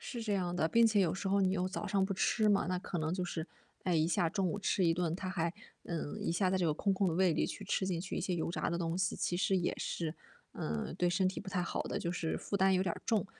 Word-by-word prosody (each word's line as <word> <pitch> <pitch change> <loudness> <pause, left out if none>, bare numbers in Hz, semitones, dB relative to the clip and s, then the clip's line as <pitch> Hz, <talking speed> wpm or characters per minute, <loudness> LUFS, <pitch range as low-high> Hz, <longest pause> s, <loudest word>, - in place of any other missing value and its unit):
是 240 - -5
这 215 -2 -1
样 180 -2 0
的。 160 - +2
并 230 +7 +5
且 215 -2 +3
有 180 -3 +2
时 195 0 -3
候 200 +1 +3
你 185 -1 +3
又 185 -1 0
早 190 - -4
上 195 -1 +2
不 195 - -1
吃 215 +3 +2
嘛， 200 -1 +3
那 180 0 0
可 180 -1 -4
能 155 0 -1
就 185 - -2
是， 170 -1 -4 0.4
哎， 180 - +2
一 160 0 +3
下 170 0 +2
中 190 -1 0
午 205 - -2
吃 195 -2 +1
一 165 - +4
顿， 170 -1 0
它 185 0 -4
还 170 -2 -1 0.3
嗯， 165 -4 -4
一 - - 0
下 185 +1 +2
在 190 - +2
这 180 - +2
个 155 - +3
空 195 +5 +1
空 190 0 +1
的 165 - +1
胃 185 0 +4
里 - - +1
去 205 - -6
吃 195 0 0
进 180 -3 -1
去 185 - -4
一 - - -1
些 180 - -1
油 165 - -1
炸 170 - -1
的 170 - -1
东 165 0 -1
西， 185 -1 0
其 175 - -1
实 190 +1 +2
也 175 - 0
是， 165 -2 -3 0.4
嗯， 75 -1 -3
对 175 - +3
身 185 +1 +2
体 190 - -4
不 200 - -9
太 185 -2 0
好 - - -2
的， - - -3
就 170 -5 -2
是 170 -2 -2
负 200 - -2
担 190 0 +4
有 185 - +3
点 175 -3 -1
重。 220 -3 +1
185 Hz, 325 characters per minute, -33 LUFS, 170-195 Hz, 0.4 s, 并